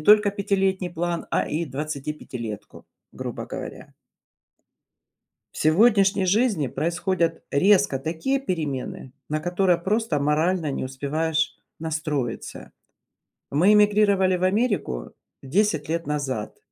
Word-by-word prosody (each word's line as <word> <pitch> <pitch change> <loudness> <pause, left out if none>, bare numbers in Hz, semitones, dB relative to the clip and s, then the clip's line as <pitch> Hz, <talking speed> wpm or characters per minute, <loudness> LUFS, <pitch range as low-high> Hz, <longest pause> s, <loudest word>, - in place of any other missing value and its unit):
только 210 +5 +6
пятилетний 195 -2 0
план, 175 0 -2
а - - +1
и 160 +3 -1
двадцатипятилетку, 135 -7 -6 0.3
грубо - - -6
говоря. - - -8 1.6
В - - -13
сегодняшней 195 +3 +4
жизни 205 - +2
происходят 170 - -1
резко 190 -1 +4
такие 170 - -1
перемены, 145 - -4 0.2
на 155 - 0
которые 175 +1 +1
просто 200 -4 0
морально 155 +2 +1
не - - -3
успеваешь 155 +4 -1 0.2
настроиться. 150 -6 -3 0.8
Мы 175 +9 +4
эмигрировали 205 -3 +4
в 180 - -1
Америку 185 - 0 0.3
10 165 +2 +1
лет 165 +1 -2
назад, 135 -7 -3
170 Hz, 105 wpm, -24 LUFS, 150-195 Hz, 1.6 s, только